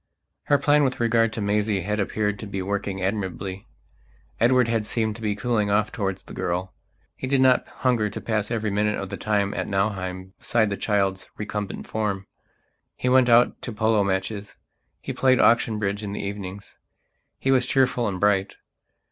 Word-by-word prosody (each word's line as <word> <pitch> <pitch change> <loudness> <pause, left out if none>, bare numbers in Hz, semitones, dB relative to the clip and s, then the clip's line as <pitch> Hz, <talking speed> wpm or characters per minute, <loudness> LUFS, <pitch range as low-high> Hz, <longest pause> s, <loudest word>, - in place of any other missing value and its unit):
Her 145 - +4
plan 145 +1 +3
with 130 -2 0
regard 115 -1 +3
to 110 - -4
Maisie 105 0 +1
had 105 +4 -2
appeared 105 0 -1
to 110 - -6
be 95 -1 -4
working 100 -1 -3
admirably. 95 -1 -3 0.7
Edward 125 +1 +4
had 115 -2 0
seemed 110 -2 -1
to - - -12
be 105 -2 -1
cooling 110 -2 0
off 105 +1 +2
towards 95 -3 -3
the - - -12
girl. 90 +2 -2 0.4
He 130 - -5
did 135 0 +2
not 130 -1 +4
hunger 120 -5 0
to 100 - -6
pass 110 -2 -1
every 110 -3 -1
minute 105 +1 +1
of 100 - -5
the - - -4
time 100 -2 0
at - - -3
Nauheim 95 -2 -2
beside 110 -3 +1
the - - 0
child's 95 -2 0
recumbent 105 -1 -4
form; 105 -3 -2 0.7
he 125 - -1
went 130 -1 +5
out 120 +1 +4
to 120 - -5
polo 110 -1 +2
matches; 100 +2 -3 0.4
he - - -4
played 130 -1 +3
auction 115 -2 +4
bridge 100 0 -2
in 100 -2 -5
the - - -4
evenings; 100 0 -7 0.6
he 135 - 0
was 130 -1 +3
cheerful 125 -3 +2
and 95 -2 -3
bright. 100 -1 +2
105 Hz, 180 wpm, -24 LUFS, 100-115 Hz, 0.7 s, went